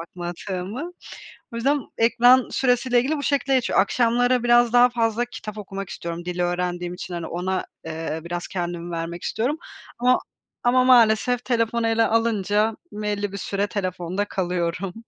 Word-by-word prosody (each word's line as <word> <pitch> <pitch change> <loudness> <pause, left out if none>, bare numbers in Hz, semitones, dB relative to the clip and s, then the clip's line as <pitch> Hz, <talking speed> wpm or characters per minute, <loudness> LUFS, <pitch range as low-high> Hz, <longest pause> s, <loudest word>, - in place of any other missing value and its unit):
bakmadığımı. 180 - -5 0.6
O 230 - -5
yüzden 275 +5 +1 0.2
ekran 245 +2 +5
süresiyle 245 -1 +2
ilgili 280 +6 0
bu 285 - -4
şekilde 275 -1 +1
geçiyor. 255 -6 +3
Akşamları 245 +3 +2
biraz 240 -1 +5
daha 245 0 +7
fazla 230 0 0
kitap 215 -3 -8
okumak 195 -1 -6
istiyorum 170 0 -6
dil 180 0 -4
öğrendiğim 175 0 -1
için, 180 0 -7
hani, 170 -1 -4
ona, 185 +3 -2 0.2
eee, 160 0 -4
biraz 175 0 -4
kendim 175 -1 -4
vermek 170 +1 -4
istiyorum 260 +8 -1 0.4
ama 250 +1 +4 0.5
ama 255 +1 +4
maalesef 245 0 +4
telefonu 230 -1 0
ele 225 0 +3
alınca 220 -1 +1 0.2
belli 205 -1 -3
bir 200 - -5
süre 200 +1 -1
telefonda 185 -1 -2
kalıyorum. 180 -1 -2
210 Hz, 145 wpm, -23 LUFS, 180-245 Hz, 0.6 s, daha